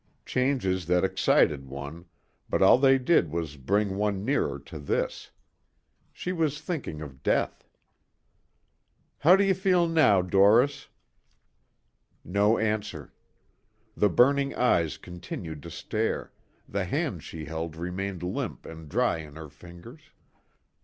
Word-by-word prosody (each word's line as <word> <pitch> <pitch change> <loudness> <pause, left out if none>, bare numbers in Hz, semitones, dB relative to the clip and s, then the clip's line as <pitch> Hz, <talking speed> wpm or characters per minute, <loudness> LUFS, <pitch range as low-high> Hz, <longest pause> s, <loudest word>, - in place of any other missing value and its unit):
Changes 120 - 0
that 90 0 +2
excited 75 -6 +2
one, 70 +5 -8 0.4
but - - +2
all - - +7
they 135 0 +5
did 130 - +2
was 80 -2 -4
bring 100 +8 0
one 105 -1 -1
nearer 110 - 0
to 70 +3 -10
this. 70 - -2 0.8
She 180 - -5
was 155 -5 -1
thinking 150 - -5
of 65 -2 -11
death. - - -1 1.5
"How 175 +5 +7
do 195 - +3
you 195 -1 +3
feel 185 -2 +2
now, 150 - +4
Doris?" 100 +9 +3 1.4
No 100 +5 +2
answer. 105 -8 -3 0.8
The 105 - +3
burning 140 +8 +3
eyes 85 - +1
continued 85 -3 -8
to - - -9
stare, - - -3 0.4
the - - -2
hand - - -2
she 80 -2 -8
held 80 +1 -5
remained 90 +2 -4
limp 90 - -4
and 80 -2 -10
dry 120 -3 +1
in 75 -2 -10
her 80 -1 -9
fingers. 85 - -14
95 Hz, 125 wpm, -27 LUFS, 80-125 Hz, 1.5 s, all